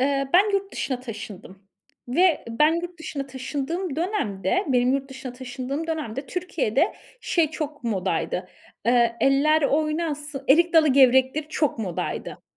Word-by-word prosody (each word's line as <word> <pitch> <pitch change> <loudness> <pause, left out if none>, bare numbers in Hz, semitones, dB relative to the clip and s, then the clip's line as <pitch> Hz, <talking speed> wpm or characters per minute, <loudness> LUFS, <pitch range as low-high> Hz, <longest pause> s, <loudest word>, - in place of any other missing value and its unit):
Eee, 275 0 +1
ben 400 +3 +5
yurt 395 0 -1
dışına 260 -2 -3
taşındım 210 -5 -9 0.5
ve 345 +6 +3
ben 300 +8 +3
yurt 350 -1 -7
dışına 285 -4 -5
taşındığım 280 +5 -4
dönemde, 325 - -1
benim 250 0 +3
yurt 275 0 -2
dışına 265 -2 -7
taşındığım 260 +4 -5
dönemde 285 -5 -4
Türkiye'de 345 - 0 0.3
şey 325 -4 +1
çok 300 -4 -5
modaydı, 190 -3 -1 0.4
eee, 235 -1 +3
eller 300 +3 +4
oynasın, 295 -1 -1
erik 340 +5 +5
dalı 315 -2 +6
gevrektir 265 +2 +4
çok 300 -6 0
modaydı. 185 -6 -4
275 Hz, 135 wpm, -24 LUFS, 250-320 Hz, 0.5 s, dalı